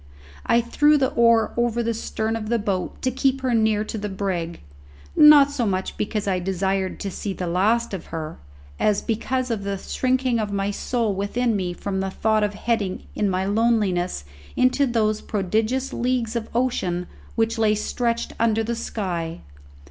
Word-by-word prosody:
I 235 - +4
threw 295 +6 +3
the 265 -2 +2
oar 230 -2 +3
over 235 0 +1
the 230 0 0
stern 220 0 -2
of 215 -1 -4
the 235 - +2
boat 195 -4 -2
to 255 - +1
keep 265 +1 +1
her 255 -2 0
near 220 -2 +2
to 220 0 -5
the 210 0 -3
brig, 185 -4 -3 0.5
not 295 -2 +8
so 275 -4 -1
much 190 -1 -2
because 210 0 -2
I 185 -2 +1
desired 190 +1 -1
to 200 - -3
see 195 +2 -4
the 185 - -4
last 210 +7 +1
of 185 - -5
her, 160 -1 -6 0.4
as 210 -1 +2
because 250 +3 -1
of 215 -3 -2
the 200 0 -2
shrinking 255 +3 0
of 210 -2 -2
my 200 0 -1
soul 230 0 -1
within 220 +4 0
me 180 -3 -2
from 190 +2 -3
the 190 0 -1
thought 215 +2 +1
of 205 0 -1
heading 210 -4 -1
in 205 - 0
my 185 0 0
loneliness 200 - +1 0.3
into 255 +2 +3
those 215 -3 +1
prodigious 220 +6 -1
leagues 245 -2 -1
of 230 -2 -3
ocean 185 -8 0 0.3
which 225 0 0
lay 215 -1 +3
stretched 235 +2 -2
under 225 -1 +2
the 235 +2 -2
sky. 175 -8 -4
215 Hz, 180 wpm, -23 LUFS, 195-235 Hz, 0.5 s, not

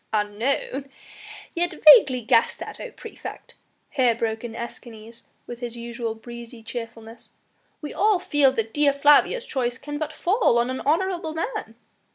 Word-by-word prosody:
"Unknown, 230 +6 -1 0.6
yet 345 0 -1 0.2
vaguely 255 -4 +3
guessed 230 0 +2
at, - - -9
O - - -6
praefect," - - -10 0.4
here 250 -4 +2
broke 225 0 -2
in 230 -1 -6
Escanes, 230 -1 -9 0.2
with 240 -1 -8
his 240 -1 -6
usual 235 -1 -5
breezy 235 0 -11
cheerfulness; 230 0 -8 0.5
"we 295 - -5
all 420 -1 +3
feel 290 -6 +3
that 225 -3 -3
Dea 295 -1 +3
Flavia's 295 - +4
choice 250 - -2
can 290 +2 -6
but 310 -1 -3
fall 360 - +2
on 240 +2 +1
an 260 - -4
honourable 340 +1 0
man." 330 - -4
245 Hz, 150 wpm, -24 LUFS, 230-295 Hz, 0.6 s, Flavia's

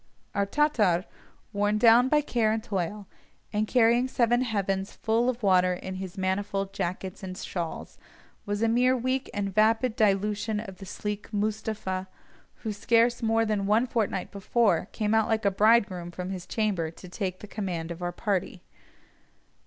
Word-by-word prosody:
Our 200 0 0
Tatar, 210 - +2 0.5
worn 205 +1 +1
down 235 +3 +6
by 300 +1 +4
care 235 -6 +1
and 220 0 -1
toil, 200 0 -3 0.5
and 210 +1 0
carrying 240 +1 +4
seven 240 -1 +2
heavens 195 -5 -1
full 230 +3 +1
of 250 -2 -3
water 185 -2 +4
in 190 +1 -6
his 190 0 -7
manifold 195 +1 -1
jackets 185 +3 -4
and 185 -1 -6
shawls, 170 -3 -5 0.4
was 205 +1 -2
a - - +4
mere 250 +3 +3
weak 255 +2 -1
and 200 -1 -3
vapid 225 +3 +3
dilution 210 -1 +1
of 195 -4 -8
the 195 - -9
sleek 210 +2 -5
Moostapha, 210 -3 -2 0.6
who 220 -2 -2
scarce 230 +3 +2
more 225 0 +2
than 210 -2 -1
one 220 +4 +3
fortnight 220 -6 -2
before 200 -2 +1
came 215 -1 -1
out 220 -1 +3
like 220 -2 0
a 200 - +4
bridegroom 200 -4 +3
from 180 +2 -5
his 180 -2 -6
chamber 200 -7 -1
to 170 +3 -12
take 185 0 -4
the - - -7
command 180 -6 -4
of 170 +1 -7
our 175 0 -2
party. 190 -2 -2
210 Hz, 165 wpm, -27 LUFS, 190-225 Hz, 0.6 s, down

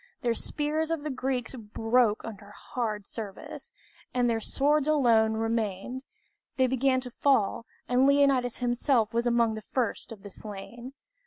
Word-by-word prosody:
The 240 -1 +2
spears 305 +5 -2
of 325 -3 -2
the 300 - -2
Greeks 260 -1 -2
broke 225 -1 +1
under 205 -2 -9
hard 210 -1 -4
service, 205 -3 -8 0.4
and 245 -1 +3
their 230 -1 +1
swords 290 +5 +2
alone 230 -7 +4
remained; 225 +2 -2 0.5
they 260 - +4
began 260 +1 +2
to 250 -1 -8
fall, 230 -4 +1 0.2
and 250 +2 +4
Leonidas 275 -4 +3
himself 240 -2 +1
was 235 +1 +1
among 235 -2 +3
the 220 - -5
first 240 +2 -2
of 215 -3 -10
the 205 - -9
slain. 225 +6 -7
240 Hz, 150 wpm, -28 LUFS, 220-265 Hz, 0.5 s, alone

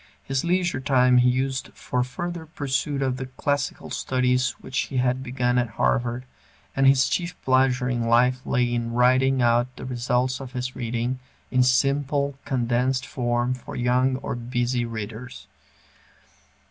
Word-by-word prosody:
His 135 -1 -1
leisure 175 -4 +1
time 125 -2 +4
he 125 0 +5
used 130 +1 -1
for 125 0 -1
further 170 +5 -5
pursuit 140 -2 -2
of 130 -1 -1
the 130 -1 -5
classical 145 +2 -2
studies 125 0 +1
which 130 - -10
he 135 - -4
had 125 +1 +1
begun 125 -1 0
at 120 -1 -1
Harvard, 120 0 0 0.5
and 135 0 +4
his 135 -1 +5
chief 175 0 -2
pleasure 130 -1 +2
in 120 -2 -1
life 125 +2 +3
lay 120 -1 +1
in 115 -1 -2
writing 130 +1 +3
out 120 +1 +2
the - - -8
results 125 +1 0
of 130 -1 -8
his 125 0 -4
reading, 120 +1 -2 0.3
in 130 - +3
simple, 140 +2 +2
condensed 125 0 0
form 120 0 -1
for 125 - -8
young 125 +2 +2
or 130 - -4
busy 120 0 -1
readers. 115 +1 -7
125 Hz, 150 wpm, -24 LUFS, 125-135 Hz, 0.5 s, he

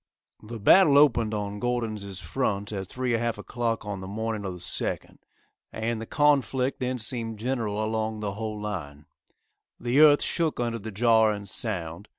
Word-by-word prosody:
The 115 +1 -8
battle 145 - +6
opened 120 -7 +4
on 105 0 -4
Gordon's 115 -3 -2 0.2
front 100 -3 -2
at 95 -3 -4
3 125 +4 -3
1/2 115 -1 0
o'clock 115 +1 -3
on 100 -2 -5
the 95 - -7
morning 110 +1 -3
of 95 - -3
the - - -8
2d, 90 - -2 0.5
and 110 0 -3
the 115 - -7
conflict 140 -3 +2
then 125 0 -1
seemed 115 -1 -3
general 110 -3 -2
along 110 0 -2
the 105 -2 -3
whole 110 0 -5
line. 75 -9 -6 0.7
The 120 +4 +1
earth 150 -1 +7
shook 165 -5 -1
under 115 -1 -1
the 110 +1 -7
jar 110 +1 +4
and 100 -1 -6
sound. 95 -3 -3
110 Hz, 165 wpm, -26 LUFS, 105-120 Hz, 0.7 s, earth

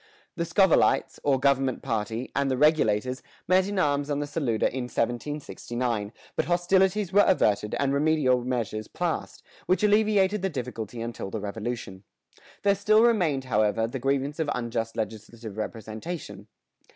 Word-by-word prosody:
The 170 -1 -1
"Scovillites," 175 +2 +3
or 135 -2 +2
government 135 -1 +1
party, 115 0 -3
and 140 0 +1
the 130 - 0
Regulators 130 -4 +2 0.3
met 185 +1 +4
in 205 0 -3
arms 145 -4 +1
on 145 - 0
the 145 - -1
Saluda 145 -7 -1
in 130 -2 -2
1769, 120 -3 -3 0.2
but 160 - 0
hostilities 185 +2 +2
were 205 +1 +7
averted 105 - +2
and 140 -1 +1
remedial 140 -4 +2
measures 115 -4 -3
passed, 175 -1 -3 0.2
which 185 +4 +2
alleviated 210 -1 +3
the 190 - 0
difficulty 120 - -5
until 115 -4 -5
the 110 - -4
Revolution.[117:1] 105 -2 -7 0.2
There 200 - +4
still 215 +3 +4
remained, 175 - +2
however, 110 -2 +1
the 120 +4 -5
grievance 140 +4 -1
of 160 -2 0
unjust 115 -1 -3
legislative 110 0 -6
representation. 110 - -6
135 Hz, 145 wpm, -26 LUFS, 115-170 Hz, 0.3 s, were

